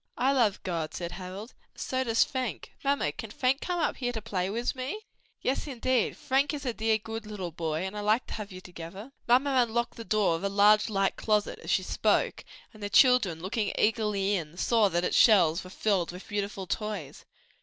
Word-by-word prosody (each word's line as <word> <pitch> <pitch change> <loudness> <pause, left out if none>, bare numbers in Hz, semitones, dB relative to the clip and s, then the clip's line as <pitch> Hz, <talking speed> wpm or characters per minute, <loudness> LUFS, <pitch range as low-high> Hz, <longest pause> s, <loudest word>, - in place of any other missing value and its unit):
"I 260 +2 +3
love 235 -8 +2
God," 165 -4 -3
said 170 -1 -4
Harold, 190 +5 -8 0.2
"and - - -17
so 260 0 -1
does 230 -2 +3
Fank: 255 -4 -4
Mamma, 275 - +1
can 225 - -8
Fank 255 +5 0
come 355 -1 -2
up 315 - 0
here 245 -2 -1
to 225 - -3
play 195 -4 -2
wis 235 +4 -1
me?" 265 +10 -4 0.4
"Yes, 270 +4 -1
indeed: 255 -3 0
Frank 280 +2 +1
is 285 - -7
a 245 - -1
dear, 220 0 +1
good 220 0 -7
little 190 -5 -5
boy, 160 0 -2
and 190 +2 -5
I - - -3
like 215 +4 +2
to - - -8
have 210 -2 -6
you 185 0 -9
together." 180 +7 -9 0.2
Mamma 260 +4 +4
unlocked 235 +1 -2
the 230 - -6
door 215 -6 +2
of 165 - -6
a 200 - +1
large 210 +2 +5
light 195 -2 0
closet, 210 -1 0
as - - -9
she - - +2
spoke, - - +1 0.3
and 215 - -15
the 205 - -3
children, 205 - +4
looking 205 +2 -1
eagerly 210 -2 +1
in, 170 -3 -3
saw 220 0 +3
that 175 -1 0
its - - 0
shelves 180 -7 +5
were 185 - -10
filled 190 -3 0
with 180 +2 -10
beautiful 200 -1 -3
toys. 205 -7 -4
210 Hz, 210 wpm, -28 LUFS, 190-240 Hz, 0.4 s, large